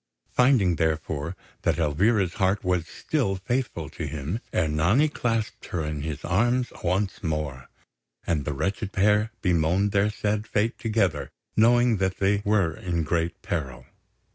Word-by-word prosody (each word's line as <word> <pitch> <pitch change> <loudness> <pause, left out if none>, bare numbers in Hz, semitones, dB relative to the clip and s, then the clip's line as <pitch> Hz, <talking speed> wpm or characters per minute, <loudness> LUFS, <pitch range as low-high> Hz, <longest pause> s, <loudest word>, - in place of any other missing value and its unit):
Finding, 120 - +4
therefore, 80 0 -1 0.3
that - - +1
Elvira's 90 +5 +2
heart 95 +2 +2
was 90 -2 0
still 125 - -1
faithful 120 +7 -2
to - - -5
him, 80 +7 -3
Ernani 85 - +2
clasped 115 -6 -2
her 80 -3 -2
in 75 -1 -3
his 75 -1 -5
arms 120 +8 +1
once 95 +2 0
more; 75 -5 -3 0.6
and 80 -4 0
the 75 - -2
wretched 95 +7 -2
pair 105 +3 +3
bemoaned 90 +2 +2
their 100 +1 +3
sad 105 0 -2
fate 110 +2 0
together, 95 - 0 0.3
knowing 120 +1 +4
that 95 0 0
they 100 +1 +2
were 100 -6 +2
in 85 -3 -2
great 85 +2 -1
peril. 65 -6 -4
95 Hz, 140 wpm, -26 LUFS, 80-105 Hz, 0.6 s, Finding